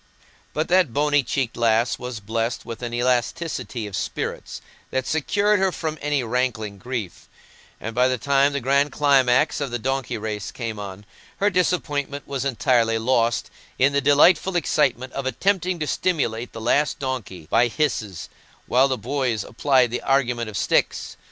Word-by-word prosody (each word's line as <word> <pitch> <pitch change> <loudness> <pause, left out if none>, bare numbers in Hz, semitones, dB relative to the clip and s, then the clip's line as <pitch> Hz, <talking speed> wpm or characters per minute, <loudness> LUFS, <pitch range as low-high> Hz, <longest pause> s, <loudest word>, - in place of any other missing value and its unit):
But 155 +1 0
that 180 -8 +3
bonny 145 0 +3
cheeked 130 -1 -2
lass 115 +1 +2
was 125 -2 -5
blessed 115 +3 -2
with 115 0 -7
an 120 -1 -4
elasticity 125 +1 -1
of 100 -2 -6
spirits - - -4 0.3
that 130 -1 -1
secured 205 +7 +1
her 190 0 +2
from 155 -3 -4
any 145 -2 0
rankling 110 -4 -2
grief; 120 -6 -6 0.5
and 115 - -5
by 125 +2 +3
the 130 0 0
time 140 +2 +3
the 140 - 0
grand 140 +3 +2
climax 135 -1 +3
of 140 - -1
the 120 - -2
donkey 135 +1 -2
race 105 -2 -4
came 115 -3 -5
on, 100 0 -8 0.3
her 205 +1 +2
disappointment 150 -6 -1
was 135 -2 -3
entirely 120 -3 +2
lost 115 0 +1 0.3
in 140 +2 +3
the 140 - +2
delightful 150 +6 +4
excitement 135 -6 +1
of 135 -1 -3
attempting 185 +4 0
to 155 - -2
stimulate 125 -10 -1
the 115 - -8
last 145 +6 +1
donkey 125 - -5
by 120 +1 +4
hisses, 115 - -2 0.4
while 130 +2 +4
the 130 -1 -1
boys 125 -2 -1
applied 130 0 +2
the 125 - -2
argument 125 -4 +1
of 105 - -5
sticks. - - 0
130 Hz, 165 wpm, -23 LUFS, 115-145 Hz, 0.5 s, delightful